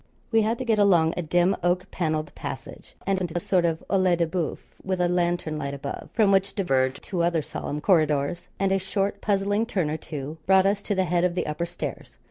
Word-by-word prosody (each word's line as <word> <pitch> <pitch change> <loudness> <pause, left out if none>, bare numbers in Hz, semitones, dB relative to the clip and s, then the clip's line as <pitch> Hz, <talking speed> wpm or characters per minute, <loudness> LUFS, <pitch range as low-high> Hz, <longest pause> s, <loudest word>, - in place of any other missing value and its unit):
We 225 -1 +4
had 220 +2 +1
to 260 - -4
get 220 -3 +2
along 175 -5 +4
a - - -1
dim 175 +4 +2
oak 175 +1 0
panelled 155 -3 -2
passage, - - -8
and 195 -1 0
into 175 -1 -2
a - - +2
sort 180 0 +1
of 165 -1 -1
oeil 185 -2 +4
de 170 0 +1
boeuf, 165 -1 -2 0.3
with 190 -1 -2
a 180 - +3
lantern 175 -3 0
light 140 -1 -3
above, 140 0 -6
from 215 -4 +4
which 195 0 +2
diverged 135 -9 +1
two 180 -4 -2
other 170 -2 +1
solemn 150 +1 -5
corridors, 155 -1 +2
and 195 0 +1
a 195 - +3
short 195 +1 -2
puzzling 205 +2 +1
turn 180 -10 0
or 155 - -1
two 150 0 -7
brought 190 0 +5
us 200 +1 +2
to 205 - -2
the 190 0 +2
head 175 0 +1
of 180 -1 +1
the - - -1
upper 160 +3 -2
stairs. 175 - -6
175 Hz, 225 wpm, -25 LUFS, 160-195 Hz, 0.3 s, brought